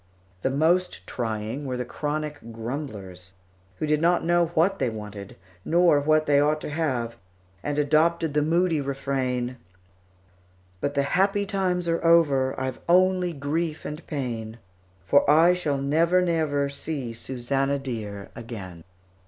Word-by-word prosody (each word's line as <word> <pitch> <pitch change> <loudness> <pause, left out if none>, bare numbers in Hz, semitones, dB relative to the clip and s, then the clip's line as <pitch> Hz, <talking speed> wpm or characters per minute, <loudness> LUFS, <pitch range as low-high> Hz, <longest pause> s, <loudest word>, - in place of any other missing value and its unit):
The 130 - +1
most 160 - +1
trying 115 +4 -3
were 125 -1 -2
the 125 - -3
chronic 150 -2 -4
grumblers, 110 -7 -7 0.4
who 155 - -3
did 150 0 +1
not 175 +1 +3
know 175 0 +3
what 185 +5 +2
they 130 - +1
wanted, 105 -3 -8 0.3
nor 170 - +4
what 155 +2 +2
they 145 -1 +4
ought 150 +1 +2
to - - -5
have, 130 -7 -2 0.4
and 145 +5 -3
adopted 155 +2 +2
the 150 - +2
moody 165 0 +2
refrain: 130 -2 -2 1.2
But 145 +6 -2
the 140 - +2
happy 195 +6 +1
times 185 -3 -1
are 165 0 0
over, 145 -6 +3
I've 130 -1 -3
only 185 0 +4
grief 155 +2 -3
and 150 +3 -6
pain, 115 -6 -4 0.5
For 140 +9 +3
I 165 +4 +6
shall 155 -6 -1
never, 160 +6 +2
never 160 -5 +1
see 140 -3 -5
Susannah 135 +4 -1
dear 110 -7 -6
again. 95 -8 -8
145 Hz, 140 wpm, -25 LUFS, 125-165 Hz, 1.2 s, I